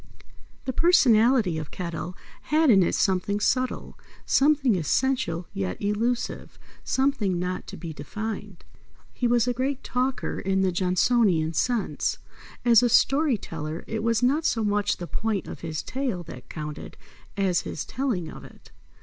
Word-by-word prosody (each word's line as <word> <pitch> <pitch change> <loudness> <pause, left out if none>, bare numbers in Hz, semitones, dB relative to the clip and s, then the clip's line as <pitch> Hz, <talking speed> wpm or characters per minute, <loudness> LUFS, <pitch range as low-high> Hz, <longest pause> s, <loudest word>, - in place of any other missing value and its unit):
The 260 - -2
personality 240 - +4
of 155 - -7
Kettle 175 0 -5 0.3
had 310 -2 +4
in 195 -3 +6
it 175 - +1
something 195 +2 +1
subtle; 255 +4 -1 0.3
something 275 -5 +3
essential 180 - 0
yet 95 -2 -3
elusive; 225 +4 -2 0.3
something 260 -9 +1
not 180 +1 -3
to - - -8
be 165 -2 -7
defined. 205 +5 -6 0.5
He 245 - 0
was 240 0 +2
a 245 - +1
great 265 +2 -2
talker 250 +1 -2
in 190 0 0
the 185 - +2
Johnsonian 180 -2 +2
sense. 235 +6 0 0.5
As 235 -2 +7
a 245 - +3
story 275 +1 +3
teller, 160 -3 -6
it 220 -1 -3
was 230 +1 +1
not 285 +6 +3
so 225 -7 +1
much 205 -1 +1
the 175 - -5
point 210 +1 -2
of - - -7
his 160 -2 -4
tale 255 -10 -3
that 125 -5 -11
counted 150 -1 -7 0.4
as 190 -3 +2
his 150 - -5
telling 240 -11 -2
of - - -10
it. - - -16
210 Hz, 150 wpm, -25 LUFS, 175-250 Hz, 0.5 s, As